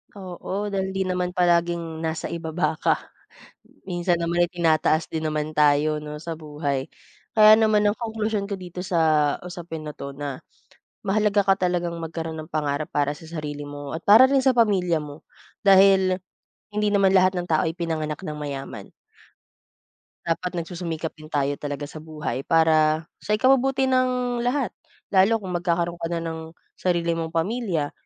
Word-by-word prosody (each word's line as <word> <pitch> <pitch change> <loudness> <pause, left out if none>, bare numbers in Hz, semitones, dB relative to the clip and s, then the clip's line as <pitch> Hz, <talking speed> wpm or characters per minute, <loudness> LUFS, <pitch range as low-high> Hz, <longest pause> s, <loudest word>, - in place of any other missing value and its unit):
Oo, 195 +2 -5
dahil 190 -1 -2
hindi 195 - +1
naman 180 -1 -2
palaging 170 -2 +1
nasa 160 0 -3
ibaba 160 -1 -2
ka. - - +3 0.9
Minsan 175 -1 0
naman 175 +1 +2
ay - - -13
tinataas 160 -2 +2
din 160 -1 -3
naman 155 0 -1
tayo, 150 +1 +3
'no, 150 0 -7
sa 165 -1 -5
buhay. 145 -3 -3 0.5
Kaya 215 0 +8
naman 215 -1 +3
ang 205 - -2
konklusyon 220 -3 -2
ko 200 - -5
dito 180 -1 -6
sa 155 -5 +3
usapin 175 -2 -7
na 150 -1 -8
'to 140 0 -6
na 140 -1 -5 0.6
mahalaga 210 +1 +2
ka 195 - +5
talagang 175 -1 -1
magkaroon 165 0 -5
ng 155 - -21
pangarap 150 -1 -2
para 145 0 0
sa - - -14
sarili 150 -3 -6
mo 145 +1 -6
at 165 - -10
para 225 +6 +8
rin 270 -1 +2
sa 265 - +5
pamilya 190 -8 +2
mo. 145 +1 -10 0.4
Dahil 190 -1 +5 0.5
hindi 210 0 +1
naman 195 -2 +3
lahat 185 0 +4
ng 175 - -1
tao 155 - +2
ay 165 - -5
pinanganak 160 0 -3
nang 150 -3 -5
mayaman. 135 -8 -6 1.3
Dapat 175 +2 -1
nagsusumikap 165 -1 -4
din 155 0 -14
tayo 145 -2 0
talaga 145 0 -4
sa 155 +1 -10
buhay 150 -5 -4
para 160 -1 +3 0.2
sa 210 - +1
ikabubuti 265 +2 +3
ng 250 -1 +1
lahat. 245 -2 0 0.4
Lalo 195 +4 +5
kung 190 -3 -6
magkakaroon 170 0 -1
ka 165 - -1
na 170 - -1
ng 160 0 -4 0.4
sarili 170 -2 0
mong 165 -1 -3
pamilya, 170 -4 -1
170 Hz, 165 wpm, -24 LUFS, 155-195 Hz, 1.3 s, Kaya